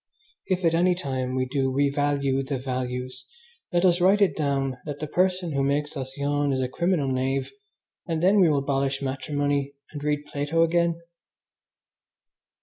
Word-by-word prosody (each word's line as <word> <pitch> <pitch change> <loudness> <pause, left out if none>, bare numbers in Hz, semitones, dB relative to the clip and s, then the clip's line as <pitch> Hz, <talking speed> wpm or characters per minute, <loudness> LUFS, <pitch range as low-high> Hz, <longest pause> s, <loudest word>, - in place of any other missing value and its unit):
If 185 -2 0
at 165 - +4
any 180 +2 +3
time 130 -7 -3
we 130 0 +1
do 135 0 0
revalue 140 0 +1
the 135 0 -3
values, 125 0 -4 0.4
let 175 0 +2
us 175 -1 +3
write 195 +3 +5
it 195 -8 +3
down 135 -3 -1
that 145 -2 -5
the 155 - -4
person 180 +1 0
who 140 -1 0
makes 145 +2 0
us 130 -1 -6
yawn 145 0 0
is 130 - 0
a 130 - 0
criminal 160 0 0
knave, 130 +1 -1 0.6
and 165 -1 -1
then 200 +3 +5
we 180 -4 +6
will 150 - +2
abolish 135 0 0
matrimony 140 +1 -1 0.2
and 145 -1 -7
read 150 0 -1
Plato 145 +4 0
again. 170 0 +1
145 Hz, 165 wpm, -25 LUFS, 135-165 Hz, 0.6 s, we